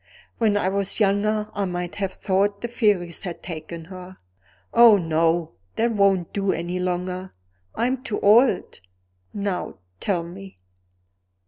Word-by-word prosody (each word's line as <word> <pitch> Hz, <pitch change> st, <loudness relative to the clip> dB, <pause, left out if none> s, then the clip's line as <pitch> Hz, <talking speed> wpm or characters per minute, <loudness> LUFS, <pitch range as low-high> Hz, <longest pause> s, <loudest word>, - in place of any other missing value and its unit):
When 215 Hz, -3 st, +3 dB
I 195 Hz, -, 0 dB
was 200 Hz, +2 st, 0 dB
younger 210 Hz, +1 st, +1 dB
I 200 Hz, -, -1 dB
might 180 Hz, -1 st, -4 dB
have 195 Hz, -2 st, -2 dB
thought 200 Hz, +1 st, 0 dB
the 235 Hz, -, -2 dB
fairies 205 Hz, -8 st, 0 dB
had 175 Hz, -3 st, -7 dB
taken 165 Hz, -1 st, -7 dB
her. 185 Hz, +1 st, -10 dB, 0.6 s
Oh, 235 Hz, -3 st, +8 dB
no! 165 Hz, -1 st, +1 dB, 0.2 s
that 235 Hz, +1 st, +1 dB
won't 195 Hz, -5 st, +2 dB
do 195 Hz, -1 st, 0 dB
any 175 Hz, +2 st, -3 dB
longer; 180 Hz, +1 st, -3 dB, 0.4 s
I'm 255 Hz, +2 st, 0 dB
too 215 Hz, -, -3 dB
old. 230 Hz, +5 st, +4 dB, 0.5 s
Now 200 Hz, -2 st, -3 dB, 0.2 s
tell 180 Hz, -5 st, -1 dB
me." 190 Hz, +3 st, -11 dB
195 Hz, 135 wpm, -23 LUFS, 180-205 Hz, 0.6 s, Oh